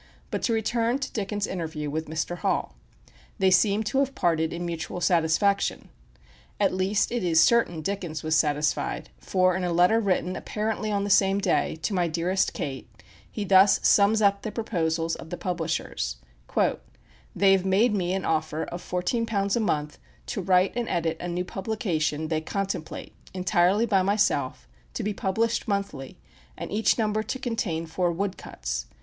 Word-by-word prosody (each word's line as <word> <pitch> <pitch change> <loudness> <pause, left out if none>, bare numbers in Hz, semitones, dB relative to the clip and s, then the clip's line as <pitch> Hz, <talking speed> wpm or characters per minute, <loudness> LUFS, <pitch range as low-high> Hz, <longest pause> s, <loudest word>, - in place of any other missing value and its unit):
But - - -2
to 235 - +1
return 230 +2 +1
to 275 - -5
Dickens' 205 -1 -2
interview 160 -4 -4
with 160 +2 -3
Mr. 160 +3 -3
Hall. - - -1 0.6
They 190 -3 +3
seem 200 +4 +3
to 265 +5 0
have 275 0 0
parted 160 -2 +1
in 175 +1 -4
mutual 170 +1 -4
satisfaction. 175 +3 +1 0.7
At 200 -2 +2
least 190 +2 +1
it 240 -4 -1
is 165 -2 +3
certain 175 -5 +3
Dickens 175 -4 -4
was 155 0 +1
satisfied, 150 - 0
for 185 - +2
in 185 - -2
a 175 - 0
letter 180 +6 +4
written, 185 -3 0
apparently 215 +1 -3
on 200 -1 0
the 200 - -1
same 195 0 +4
day, 200 - +1
to 205 - -1
"my 180 -2 +1
dearest 175 +4 0
Kate," 135 -3 -5 0.4
he 210 - -4
thus 195 0 +6
sums 210 +2 +4
up 200 0 +3
the 215 - -4
proposals 165 -7 -1
of - - -10
the 175 - -5
publishers: 160 - -2 1.2
"They 195 -1 +4
have 190 -1 +3
made 200 +5 +3
me 185 -1 0
an 190 - -3
offer 155 0 -1
of 175 +1 -6
fourteen 180 +6 -1
pounds 200 -3 0
a - - +1
month 150 -9 -1 0.3
to 200 - -3
write 185 +1 +3
and 240 -2 -2
edit 165 -1 -1
a 175 - -4
new 175 +1 -2
publication 180 -7 -2
they 155 -1 0
contemplate, 195 -1 -4 0.2
entirely 185 +3 +2
by 200 -4 +3
myself, 145 - 0 0.3
to - - -2
be 210 - -1
published 225 +6 -1
monthly, 200 -10 -3 0.4
and - - -6
each 215 +2 +2
number 215 -1 +1
to 240 - -4
contain 220 -10 -2
four 175 +2 0
wood 195 +3 -2
cuts.... - - -5
185 Hz, 170 wpm, -26 LUFS, 165-205 Hz, 1.2 s, thus